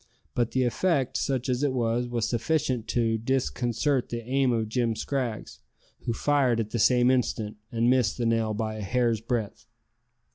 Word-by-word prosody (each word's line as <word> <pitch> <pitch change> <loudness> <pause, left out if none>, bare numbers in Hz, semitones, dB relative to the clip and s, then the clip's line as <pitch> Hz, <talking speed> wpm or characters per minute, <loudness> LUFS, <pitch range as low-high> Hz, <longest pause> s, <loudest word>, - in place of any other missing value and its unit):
But 120 -2 +1
the 130 - +1
effect, 135 +2 0
such 130 -2 -1
as 125 0 0
it 145 -3 +1
was, 120 0 0
was 120 -2 -1
sufficient 125 -1 0
to 115 -2 +1
disconcert 130 +2 0
the 115 -1 -5
aim 135 0 +2
of 115 -2 0
Jim 115 0 0
Scraggs, 120 -1 -3 0.5
who 120 - 0
fired 130 -2 +2
at 110 -1 -3
the 120 - -1
same 125 +2 +4
instant, 115 -4 -1
and 115 0 +1
missed 125 -5 +2
the 120 - -1
nail 115 -2 +1
by 110 0 -3
a - - -5
hair's 115 +1 +1
breadth. 115 -2 -3
120 Hz, 175 wpm, -27 LUFS, 115-130 Hz, 0.5 s, same